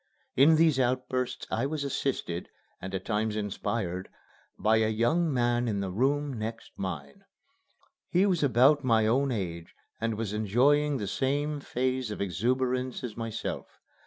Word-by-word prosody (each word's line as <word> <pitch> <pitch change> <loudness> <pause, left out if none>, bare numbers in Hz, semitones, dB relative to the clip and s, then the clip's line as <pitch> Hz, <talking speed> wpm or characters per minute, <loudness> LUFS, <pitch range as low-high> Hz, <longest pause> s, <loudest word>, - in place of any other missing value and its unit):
In 150 +5 +6
these 155 -4 +4
outbursts 125 0 -1
I 120 +5 0
was 150 0 -3
assisted, 130 -10 -2 0.3
and 95 +1 -5
at 95 - -4
times 110 0 0
inspired, 100 -3 -3 0.5
by 110 +3 +3
a 110 0 +2
young 150 +10 +2
man 120 -1 +1
in 105 -3 -1
the 95 -2 -2
room 140 +7 +1
next 115 +1 -5
mine. 95 - -6 0.9
He 185 +2 +3
was 185 -5 +1
about 140 +2 +4
my 115 -3 +3
own 130 +5 +2
age 85 -7 -4 0.2
and 115 -1 -1
was 110 -2 -3
enjoying 135 +8 +3
the 105 - -3
same 145 +7 -1
phase 130 -2 -1
of 105 - -5
exuberance 125 +7 -1
as 115 -4 -5
myself. 115 -1 -5
120 Hz, 150 wpm, -29 LUFS, 110-140 Hz, 0.9 s, In